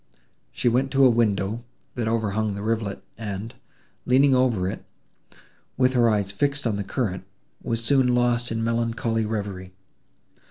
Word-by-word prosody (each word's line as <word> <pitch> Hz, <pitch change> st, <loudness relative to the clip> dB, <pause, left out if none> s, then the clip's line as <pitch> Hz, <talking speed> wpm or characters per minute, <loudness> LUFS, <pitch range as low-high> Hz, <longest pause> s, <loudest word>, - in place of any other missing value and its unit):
She -, -, -2 dB
went 125 Hz, +3 st, +2 dB
to 135 Hz, 0 st, +5 dB
a 130 Hz, -, +6 dB
window, 110 Hz, -1 st, 0 dB, 0.3 s
that 120 Hz, -3 st, -2 dB
overhung 110 Hz, -2 st, 0 dB
the 100 Hz, -, -5 dB
rivulet, 110 Hz, -3 st, -2 dB, 0.2 s
and, 105 Hz, 0 st, -5 dB, 0.5 s
leaning 135 Hz, +2 st, +5 dB
over 120 Hz, -8 st, +2 dB
it, 95 Hz, -, -5 dB, 0.9 s
with 130 Hz, 0 st, +3 dB
her 120 Hz, -2 st, +4 dB
eyes 100 Hz, -2 st, 0 dB
fixed 140 Hz, +6 st, -1 dB
on 110 Hz, -3 st, +1 dB
the 100 Hz, -, -2 dB
current, 100 Hz, -2 st, -3 dB, 0.4 s
was 115 Hz, 0 st, -1 dB
soon 125 Hz, -1 st, +3 dB
lost 120 Hz, -1 st, +1 dB
in 115 Hz, 0 st, -1 dB
melancholy 115 Hz, -1 st, -1 dB
reverie. 100 Hz, -4 st, -5 dB
115 Hz, 150 wpm, -24 LUFS, 100-125 Hz, 0.9 s, a